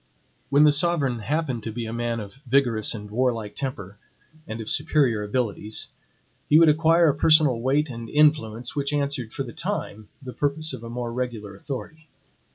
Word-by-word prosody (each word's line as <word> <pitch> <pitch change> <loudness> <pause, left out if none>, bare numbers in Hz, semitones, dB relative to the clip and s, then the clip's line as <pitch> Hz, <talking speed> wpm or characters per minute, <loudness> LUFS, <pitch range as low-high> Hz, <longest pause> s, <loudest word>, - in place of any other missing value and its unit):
When 140 +2 +5
the 150 - +7
sovereign 145 -5 0
happened 135 0 -2
to 110 - -5
be 115 +1 -5
a 110 - -5
man 120 0 -2
of 105 +4 -10
vigorous 120 -5 +2
and 105 -1 -9
warlike 115 -3 -1
temper 105 -8 -6 0.5
and 110 +1 -6
of 110 - -7
superior 140 -7 +1
abilities, 105 -1 0 0.6
he 150 - +6
would 165 -1 +7
acquire 165 +2 +4
a - - +2
personal 155 -7 +4
weight 140 +3 +1
and 115 -2 -7
influence, 125 -6 +2
which 140 0 -1
answered, 140 -5 -2
for - - -4
the - - -9
time, 105 0 -4
the 130 -3 -9
purpose 150 +2 -1
of 110 - -8
a 115 - -7
more 120 0 -4
regular 120 -5 -4
authority. 150 +8 -8
125 Hz, 175 wpm, -24 LUFS, 115-150 Hz, 0.6 s, the